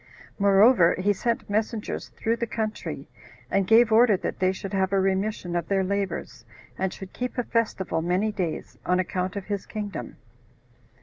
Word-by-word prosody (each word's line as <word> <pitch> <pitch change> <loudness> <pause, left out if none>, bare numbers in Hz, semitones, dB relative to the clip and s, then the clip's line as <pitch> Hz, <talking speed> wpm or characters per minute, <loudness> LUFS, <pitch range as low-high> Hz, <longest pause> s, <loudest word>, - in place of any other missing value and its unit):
Moreover, 200 -1 +5
he 205 +2 +2
sent 230 +4 -2
messengers 215 +1 -2
through 230 +1 0
the 235 - -2
country, 215 -1 -4 0.4
and 195 -1 +2
gave 230 +1 +6
order 220 -2 +6
that - - -4
they 185 0 +3
should 190 +1 -7
have 190 -1 +1
a 195 - +3
remission 190 -1 -1
of 170 -1 -1
their 195 -1 +1
labors, 195 -10 -3 0.3
and 190 0 -1
should 190 -1 -10
keep 250 +1 -4
a 245 - +1
festival 215 -8 -1
many 180 +6 +1
days, 180 -6 -4
on 180 0 +1
account 185 0 -2
of 200 -2 -4
his 200 -1 -4
kingdom. 205 - -6
195 Hz, 170 wpm, -26 LUFS, 185-220 Hz, 0.4 s, gave